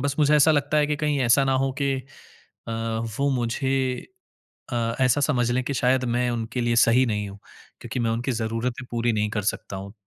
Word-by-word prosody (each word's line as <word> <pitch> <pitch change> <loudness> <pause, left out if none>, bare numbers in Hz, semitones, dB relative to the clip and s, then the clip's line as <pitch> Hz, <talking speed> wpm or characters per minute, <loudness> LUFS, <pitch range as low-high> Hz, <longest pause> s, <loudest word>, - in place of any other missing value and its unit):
बस 140 +1 -1
मुझे 150 0 +4
ऐसा 150 +2 +5
लगता 145 +1 +1
है 150 - +3
कि 150 0 -1
कहीं 150 -1 0
ऐसा 125 +3 +4
ना 135 - +1
हो 135 - 0
कि 140 -1 +1 0.8
अ, 115 - -3 0.5
वो 140 +1 +2
मुझे 130 +1 -1 0.7
अ, 115 -1 -1
ऐसा 130 +2 +3
समझ 120 -3 +1
लें 130 +1 +1
कि 140 - -2
शायद 130 +1 +2
मैं 125 0 +1
उनके 120 +1 -3
लिए 120 0 +1
सही 125 +3 +4
नहीं 105 -2 -2
हूँ 100 +1 -11 0.4
क्योंकि 125 - -4
मैं 115 -1 +1
उनकी 120 +3 -1
ज़रूरतें 115 +3 -3
पूरी 120 0 +1
नहीं 105 0 0
कर 105 -1 -2
सकता 95 - -8
हूँ। 100 +1 -8
125 Hz, 210 wpm, -24 LUFS, 115-135 Hz, 0.8 s, ऐसा